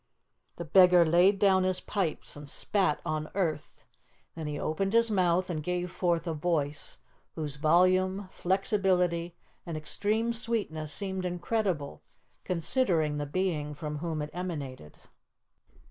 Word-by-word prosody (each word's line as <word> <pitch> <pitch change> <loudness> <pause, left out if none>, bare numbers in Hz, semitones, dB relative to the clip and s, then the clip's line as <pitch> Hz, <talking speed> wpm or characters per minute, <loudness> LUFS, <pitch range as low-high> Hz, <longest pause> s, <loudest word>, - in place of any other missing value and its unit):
The 170 - -6
beggar 180 +1 +6
laid 175 +5 +4
down 190 -1 +4
his 185 0 +1
pipes 190 -6 -3
and 145 -1 -10
spat 190 -4 +1
on 155 0 -2
earth. 155 - -2 0.5
Then 160 -2 -6
he 150 -1 -4
opened 195 +6 -1
his 230 -1 +4
mouth 180 -2 +2
and 160 -4 -3
gave 180 +2 -2
forth 170 -2 0
a 165 - -2
voice 150 -2 -2 0.4
whose 150 -3 -4
volume, 185 +5 +3
flexibility, 180 -3 0 0.3
and 165 -2 -5
extreme 210 +9 -1
sweetness 210 -10 -2
seemed 190 -1 -3
incredible, 180 - -2 0.4
considering 165 - +1
the 145 - -3
being 150 -3 -2
from 150 0 -5
whom 160 -2 -3
it 150 - -7
emanated. 145 - -6
175 Hz, 130 wpm, -29 LUFS, 155-190 Hz, 0.5 s, beggar